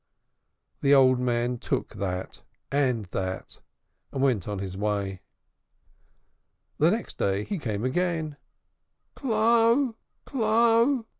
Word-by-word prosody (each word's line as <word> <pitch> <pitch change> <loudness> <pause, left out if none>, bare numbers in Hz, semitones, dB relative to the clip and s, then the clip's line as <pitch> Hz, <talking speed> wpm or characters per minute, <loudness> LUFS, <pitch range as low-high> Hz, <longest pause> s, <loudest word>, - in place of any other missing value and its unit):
The 140 0 +5
old 130 -2 +5
man 120 -1 0
took - - -2
that, 95 -1 -4 0.3
and 130 -6 +1
that, 95 0 -4 0.5
and - - -4
went 120 -9 +1
on 105 -1 -3
his 95 -1 -5
way. 100 -2 -2 1.6
The 155 - +5
next 220 +5 -3
day 100 +1 +1
he 200 - -4
came 110 -4 -3
again. 160 0 -1 0.8
"Clo'! 230 +1 +3 0.3
Clo'!" 230 +1 +3
135 Hz, 105 wpm, -26 LUFS, -, 1.6 s, The